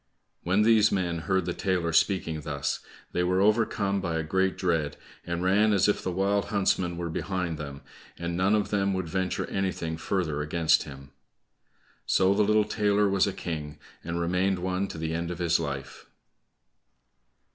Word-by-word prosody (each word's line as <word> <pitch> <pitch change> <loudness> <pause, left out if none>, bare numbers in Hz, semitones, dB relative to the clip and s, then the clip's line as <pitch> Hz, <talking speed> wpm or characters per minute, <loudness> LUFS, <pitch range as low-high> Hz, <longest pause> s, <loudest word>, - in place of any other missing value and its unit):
When 95 +4 +2
these 110 -1 +5
men 85 -3 -1
heard 95 +3 0
the 90 - -2
tailor 90 -4 -1
speaking 85 -5 +1
thus, 70 -1 -2 0.3
they 90 - 0
were 90 +1 +1
overcome 100 -1 +2
by 85 -3 -2
a 80 - -1
great 95 +4 0
dread, 80 -5 0 0.3
and 85 +1 -2
ran 105 +3 +4
as 100 -1 +3
if 105 - +1
the 95 - -2
wild 100 +2 +1
huntsman 95 -4 0
were 85 -1 -3
behind 85 -1 -3
them, 70 -1 -7 0.4
and 85 0 -3
none 95 +4 +3
of 105 - -1
them 100 -2 +1
would 95 -2 -2
venture 95 +2 -1
anything 90 -4 -2
further 80 -4 -1
against 80 +1 +2
him. 70 0 -11 1.0
So 95 +1 +4
the 105 - +2
little 105 0 +3
tailor 105 -1 +2
was 95 0 +2
a - - 0
king 75 -5 -5 0.3
and 85 +1 -3
remained 90 +3 +1
one, 90 +2 -1
to 80 - -8
the 80 0 -3
end 85 +1 -2
of 90 - -4
his 85 -1 +2
life. 70 -4 -6
90 Hz, 175 wpm, -27 LUFS, 80-100 Hz, 1.0 s, these